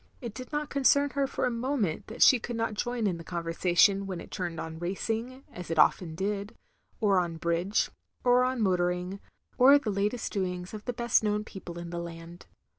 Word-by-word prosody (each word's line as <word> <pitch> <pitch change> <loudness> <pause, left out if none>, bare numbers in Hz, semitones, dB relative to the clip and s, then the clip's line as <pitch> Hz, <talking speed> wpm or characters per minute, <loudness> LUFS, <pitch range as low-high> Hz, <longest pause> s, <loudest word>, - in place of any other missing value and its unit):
It 235 -4 -6
did 255 +5 -9
not 295 -1 -2
concern 280 +1 +3
her 280 -1 0
for - - -2
a 250 - +1
moment 235 - -1
that 225 - +2
she 255 - +7
could 240 +1 -5
not 225 -1 -1
join 240 +1 -2
in 185 -4 0
the - - -8
conversation 175 +3 +2
when 185 -3 -4
it - - -11
turned 175 -4 -4
on 160 0 -6
racing, 225 +8 -3
as 180 -2 -8
it 165 - -2
often 160 +1 +3
did, 200 +3 -3 0.4
or 200 -4 +3
on 170 -2 -2
bridge, 170 +5 0 0.3
or 245 0 +5
on 255 -1 0
motoring, 180 0 0 0.4
or 270 +3 +8
the 235 -7 -2
latest 205 +4 -1
doings 180 -2 -3
of 215 -1 -8
the 245 - -1
best 235 -1 +2
known 210 0 0
people 190 -5 -9
in 170 0 -7
the 170 - -3
land. 170 +1 -9
200 Hz, 200 wpm, -29 LUFS, 175-240 Hz, 0.4 s, or